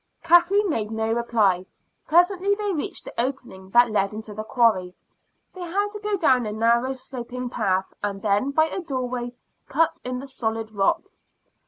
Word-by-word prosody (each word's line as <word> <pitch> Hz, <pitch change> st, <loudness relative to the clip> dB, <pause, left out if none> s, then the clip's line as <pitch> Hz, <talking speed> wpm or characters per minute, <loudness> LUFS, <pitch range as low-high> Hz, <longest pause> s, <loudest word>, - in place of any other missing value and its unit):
Kathleen 345 Hz, +5 st, +5 dB
made 220 Hz, -, -1 dB
no 220 Hz, 0 st, -1 dB
reply. 215 Hz, -6 st, +1 dB, 0.4 s
Presently 365 Hz, +4 st, +3 dB
they 410 Hz, -1 st, -2 dB
reached 300 Hz, -, -4 dB
the -, -, -8 dB
opening 240 Hz, -8 st, -5 dB
that 240 Hz, +2 st, +5 dB
led 200 Hz, -1 st, 0 dB
into 215 Hz, -1 st, -7 dB
the 215 Hz, +1 st, -5 dB
quarry. 215 Hz, -6 st, +2 dB, 0.6 s
They 370 Hz, -, -10 dB
had 390 Hz, +4 st, -1 dB
to 420 Hz, -, -7 dB
go 420 Hz, -1 st, -1 dB
down 255 Hz, -, +3 dB
a -, -, -3 dB
narrow 235 Hz, +4 st, +2 dB
sloping 250 Hz, -1 st, -6 dB
path, 190 Hz, -3 st, 0 dB
and 200 Hz, -1 st, -3 dB
then 205 Hz, +5 st, +2 dB
by 315 Hz, +3 st, +3 dB
a 345 Hz, +4 st, -4 dB
doorway 250 Hz, -5 st, -3 dB, 0.4 s
cut 320 Hz, +4 st, +1 dB
in 250 Hz, 0 st, -3 dB
the 270 Hz, +2 st, -7 dB
solid 225 Hz, -4 st, -3 dB
rock. 195 Hz, -2 st, +1 dB
245 Hz, 170 wpm, -24 LUFS, 215-320 Hz, 0.6 s, Kathleen